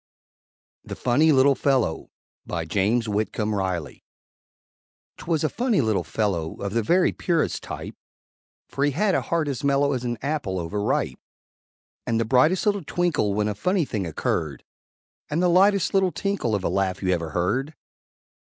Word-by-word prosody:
THE -, -, -7 dB
FUNNY 150 Hz, +6 st, +3 dB
LITTLE 135 Hz, 0 st, +5 dB
FELLOW 130 Hz, -, 0 dB, 0.4 s
BY 85 Hz, -2 st, -3 dB
JAMES 105 Hz, +7 st, +1 dB
WHITCOMB 105 Hz, 0 st, -1 dB
RILEY 95 Hz, -6 st, -3 dB, 1.1 s
'Twas 160 Hz, -2 st, -1 dB
a -, -, +3 dB
Funny 235 Hz, -, 0 dB
Little 110 Hz, -8 st, +1 dB
Fellow 85 Hz, -3 st, -2 dB
Of 100 Hz, 0 st, -4 dB
the 115 Hz, -, +2 dB
very 175 Hz, -, +3 dB
purest 170 Hz, -3 st, -1 dB
type, -, -, -7 dB, 0.7 s
For 140 Hz, -, -3 dB
he 145 Hz, -1 st, +2 dB
had 195 Hz, +6 st, +1 dB
a -, -, +2 dB
heart 165 Hz, -2 st, -1 dB
as 140 Hz, +1 st, -3 dB
mellow 140 Hz, 0 st, +2 dB
As 125 Hz, -2 st, -3 dB
an 120 Hz, -1 st, -2 dB
apple 140 Hz, -10 st, -2 dB
over 90 Hz, +5 st, -3 dB
ripe; 105 Hz, -, -1 dB, 0.9 s
And 115 Hz, -1 st, +1 dB
the 115 Hz, -, +1 dB
brightest 135 Hz, -, +3 dB
little 205 Hz, -3 st, +1 dB
twinkle 145 Hz, -, 0 dB
When 105 Hz, 0 st, +1 dB
a 105 Hz, -, -1 dB
funny 180 Hz, -, 0 dB
thing 100 Hz, -8 st, -3 dB
occurred, 80 Hz, -2 st, -2 dB, 0.7 s
And 150 Hz, -, -1 dB
the 180 Hz, 0 st, +3 dB
lightest 195 Hz, +2 st, +3 dB
little 190 Hz, -2 st, +3 dB
tinkle 200 Hz, -, -1 dB
Of 100 Hz, -, -3 dB
a -, -, 0 dB
laugh 95 Hz, -1 st, -1 dB
you 95 Hz, -, 0 dB
ever 85 Hz, -3 st, 0 dB
heard! 130 Hz, -, -1 dB
125 Hz, 165 wpm, -24 LUFS, 100-160 Hz, 1.1 s, LITTLE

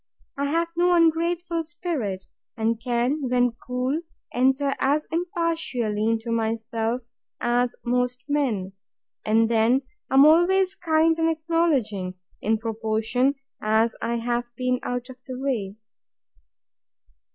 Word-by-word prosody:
I 280 Hz, -, -1 dB
have 335 Hz, +4 st, 0 dB
no 350 Hz, +1 st, +3 dB
ungrateful 335 Hz, 0 st, +2 dB
spirit, 305 Hz, -, -4 dB, 0.3 s
and 225 Hz, 0 st, 0 dB
can, 250 Hz, +3 st, 0 dB
when 245 Hz, -1 st, +3 dB
cool, 250 Hz, +6 st, -2 dB, 0.3 s
enter 265 Hz, +3 st, +2 dB
as 290 Hz, +3 st, +2 dB
impartially 325 Hz, -, -1 dB
into 225 Hz, +1 st, -1 dB
myself 230 Hz, +1 st, -1 dB, 0.4 s
as 240 Hz, 0 st, +1 dB
most 250 Hz, +1 st, 0 dB
men; 240 Hz, -11 st, 0 dB, 0.5 s
and 225 Hz, +1 st, +3 dB
then 235 Hz, +4 st, +3 dB, 0.3 s
I -, -, 0 dB
am 275 Hz, +2 st, +8 dB
always 365 Hz, +4 st, +4 dB
kind 320 Hz, -1 st, +2 dB
and 325 Hz, 0 st, +3 dB
acknowledging, 305 Hz, -, 0 dB, 0.3 s
in 220 Hz, +1 st, +2 dB
proportion 225 Hz, +4 st, 0 dB, 0.3 s
as 220 Hz, +2 st, +2 dB
I 235 Hz, +1 st, -1 dB
have 240 Hz, +1 st, -1 dB
been 255 Hz, +1 st, 0 dB
out 245 Hz, +1 st, -4 dB
of 255 Hz, 0 st, -15 dB
the 255 Hz, -1 st, -5 dB
way. 235 Hz, -8 st, -2 dB
250 Hz, 120 wpm, -24 LUFS, 225-315 Hz, 0.5 s, am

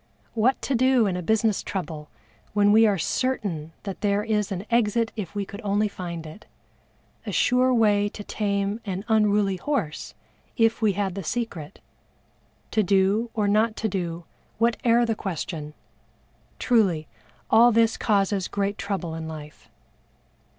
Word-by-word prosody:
What 235 Hz, +4 st, +2 dB
to 275 Hz, -, -1 dB
do 255 Hz, -1 st, +4 dB
in 190 Hz, -3 st, 0 dB
a 180 Hz, -, -3 dB
business 220 Hz, +2 st, +1 dB
trouble 160 Hz, -6 st, -5 dB, 0.4 s
when 205 Hz, 0 st, +4 dB
we 220 Hz, +1 st, +6 dB
are 200 Hz, -2 st, +2 dB
certain 175 Hz, -5 st, -2 dB
that 195 Hz, -2 st, -6 dB
there 205 Hz, 0 st, +1 dB
is 210 Hz, -2 st, -1 dB
an 190 Hz, +1 st, -4 dB
exit 230 Hz, 0 st, +2 dB
if 210 Hz, -3 st, -6 dB
we 200 Hz, -1 st, -2 dB
could 200 Hz, +3 st, -9 dB
only 205 Hz, +1 st, +1 dB
find 175 Hz, -4 st, -6 dB
it 155 Hz, +7 st, -12 dB, 0.8 s
a -, -, -2 dB
sure 255 Hz, +1 st, +3 dB
way 205 Hz, -4 st, +3 dB
to 205 Hz, -, -9 dB
tame 200 Hz, +1 st, -2 dB
an 195 Hz, 0 st, -4 dB
unruly 210 Hz, -3 st, +2 dB
horse 205 Hz, -, -3 dB, 0.4 s
if 225 Hz, 0 st, +2 dB
we 215 Hz, -2 st, +3 dB
had 195 Hz, -1 st, -1 dB
the 195 Hz, +1 st, -5 dB
secret 195 Hz, -7 st, -4 dB, 0.9 s
to 220 Hz, -, +2 dB
do 200 Hz, +4 st, +2 dB
or 210 Hz, -2 st, +1 dB
not 215 Hz, +2 st, +2 dB
to 220 Hz, -, -1 dB
do 175 Hz, -4 st, -3 dB, 0.3 s
whate'er 235 Hz, +1 st, +2 dB
the 230 Hz, -, 0 dB
question 160 Hz, -6 st, -5 dB, 0.8 s
truly 190 Hz, -10 st, +2 dB, 0.4 s
all 235 Hz, +2 st, +7 dB
this 225 Hz, 0 st, +3 dB
causes 200 Hz, -3 st, +1 dB
great 200 Hz, 0 st, -2 dB
trouble 190 Hz, -5 st, -3 dB
in 160 Hz, 0 st, -5 dB
life. 150 Hz, -2 st, -10 dB
205 Hz, 150 wpm, -25 LUFS, 185-225 Hz, 0.9 s, all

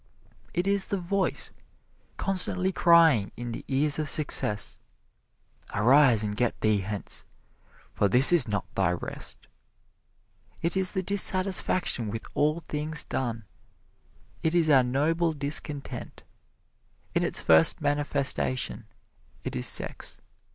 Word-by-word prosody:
It 175 Hz, +1 st, -2 dB
is 200 Hz, -1 st, 0 dB
the 200 Hz, -, -2 dB
voice 185 Hz, +1 st, -2 dB, 0.7 s
constantly 185 Hz, -1 st, +3 dB
crying 165 Hz, -, +4 dB
in 120 Hz, 0 st, -6 dB
the 115 Hz, -, -7 dB
ears 145 Hz, +2 st, +1 dB
of 155 Hz, -2 st, -1 dB
success, 105 Hz, -9 st, +2 dB, 1.0 s
"Arise 120 Hz, +1 st, +4 dB
and 105 Hz, -1 st, -3 dB
get 120 Hz, +1 st, -1 dB
thee 110 Hz, -2 st, +2 dB
hence, 100 Hz, +1 st, -4 dB, 0.7 s
for 100 Hz, -, +1 dB
this 125 Hz, -, +6 dB
is 160 Hz, -9 st, +6 dB
not 100 Hz, -2 st, -3 dB
thy 95 Hz, -2 st, 0 dB
rest." 90 Hz, -, -7 dB, 1.2 s
It 170 Hz, +2 st, -1 dB
is 190 Hz, -1 st, -1 dB
the 190 Hz, -2 st, -2 dB
dissatisfaction 185 Hz, -, +1 dB
with 110 Hz, +2 st, -6 dB
all 150 Hz, +3 st, 0 dB
things 150 Hz, 0 st, -4 dB
done 115 Hz, -4 st, -4 dB, 1.0 s
it 160 Hz, +1 st, -1 dB
is 165 Hz, -3 st, +3 dB
our 135 Hz, -2 st, +6 dB
Noble 155 Hz, +7 st, 0 dB
Discontent. 145 Hz, 0 st, -3 dB, 0.9 s
In -, -, +1 dB
its -, -, 0 dB
first 80 Hz, 0 st, +4 dB
manifestation 140 Hz, -5 st, -1 dB, 0.6 s
it -, -, -5 dB
is 60 Hz, -, +1 dB
sex. -, -, -3 dB
145 Hz, 125 wpm, -26 LUFS, 115-170 Hz, 1.2 s, this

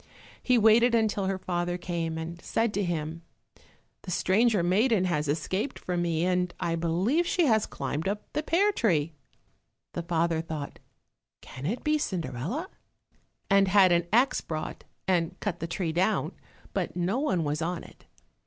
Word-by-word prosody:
He 250 Hz, -1 st, +3 dB
waited 230 Hz, +2 st, +5 dB
until 210 Hz, -4 st, +1 dB
her 195 Hz, 0 st, 0 dB
father 175 Hz, -1 st, -2 dB
came, 170 Hz, -2 st, -3 dB
and 165 Hz, +1 st, -6 dB
said 225 Hz, -1 st, 0 dB
to 205 Hz, -, 0 dB
him, 165 Hz, -2 st, -3 dB, 0.8 s
"The -, -, -9 dB
stranger 200 Hz, +2 st, +2 dB
maiden 200 Hz, +3 st, +3 dB
has 150 Hz, -4 st, 0 dB
escaped 185 Hz, -, -2 dB
from 175 Hz, -1 st, -2 dB
me, 170 Hz, -1 st, 0 dB
and 180 Hz, -1 st, +1 dB
I 165 Hz, -, 0 dB
believe 185 Hz, -, +1 dB
she 350 Hz, -1 st, +2 dB
has 220 Hz, -5 st, +3 dB
climbed 145 Hz, +5 st, -3 dB
up 205 Hz, +1 st, -2 dB
the 300 Hz, -, 0 dB
pear 360 Hz, +7 st, +2 dB
tree." 165 Hz, -, +1 dB, 0.8 s
The 175 Hz, -, -3 dB
father 165 Hz, -1 st, 0 dB
thought, 155 Hz, -3 st, -6 dB, 0.6 s
"Can 130 Hz, +3 st, -7 dB
it 230 Hz, +7 st, -3 dB
be 305 Hz, 0 st, +2 dB
Cinderella?" 175 Hz, -, -3 dB, 0.8 s
and 195 Hz, -1 st, +4 dB
had 190 Hz, -1 st, +6 dB
an 170 Hz, 0 st, +2 dB
axe 245 Hz, +5 st, +3 dB
brought 155 Hz, -1 st, -5 dB, 0.2 s
and 180 Hz, -1 st, 0 dB
cut 185 Hz, -5 st, -3 dB
the 165 Hz, -, -3 dB
tree 170 Hz, -1 st, -2 dB
down, 185 Hz, +6 st, +1 dB, 0.4 s
but -, -, -2 dB
no 180 Hz, +7 st, 0 dB
one 230 Hz, -, +1 dB
was 150 Hz, +1 st, -2 dB
on 170 Hz, +1 st, -2 dB
it. -, -, -17 dB
180 Hz, 160 wpm, -28 LUFS, 165-215 Hz, 0.8 s, had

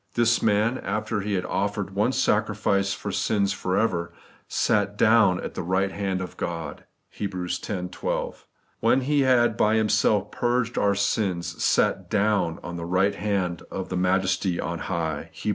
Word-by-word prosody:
* -, -, -38 dB
This 120 Hz, 0 st, +3 dB
man, 110 Hz, +4 st, +2 dB
after 105 Hz, +1 st, -2 dB
He 100 Hz, 0 st, -2 dB
had 90 Hz, -1 st, -1 dB
offered -, -, -2 dB
one -, -, +2 dB
sacrifice 100 Hz, 0 st, +1 dB
for -, -, -4 dB
sins 100 Hz, -2 st, +1 dB
for 95 Hz, 0 st, -2 dB
ever, 85 Hz, -6 st, 0 dB, 0.4 s
SAT 105 Hz, 0 st, +1 dB
DOWN 110 Hz, -5 st, +4 dB
at -, -, -5 dB
the -, -, -4 dB
right 95 Hz, +2 st, 0 dB
hand 95 Hz, -2 st, -2 dB
of 90 Hz, -, -7 dB
Gk)d' 85 Hz, -4 st, -4 dB, 0.3 s
(Heb. 100 Hz, -2 st, -5 dB
x. 90 Hz, -1 st, -2 dB, 0.3 s
12). -, -, -4 dB, 0.3 s
*When 120 Hz, +4 st, +3 dB
He 145 Hz, +3 st, +1 dB
had 120 Hz, -4 st, +3 dB
by 105 Hz, +2 st, +3 dB
Himself 110 Hz, -1 st, +2 dB
purged 120 Hz, -1 st, 0 dB
our 100 Hz, 0 st, +2 dB
sins, 90 Hz, -4 st, -1 dB
sat -, -, +2 dB
DOWN 100 Hz, -5 st, +1 dB
on 85 Hz, +1 st, -6 dB
the 85 Hz, -, -5 dB
right 90 Hz, +3 st, +2 dB
hand 95 Hz, -5 st, -2 dB
of 95 Hz, -, -5 dB
the 90 Hz, -, -3 dB
Majesty 90 Hz, 0 st, +1 dB
on 85 Hz, 0 st, -3 dB
high 80 Hz, -3 st, -2 dB
' -, -, -32 dB
(Heb. -, -, 0 dB
100 Hz, 175 wpm, -25 LUFS, 90-110 Hz, 0.4 s, DOWN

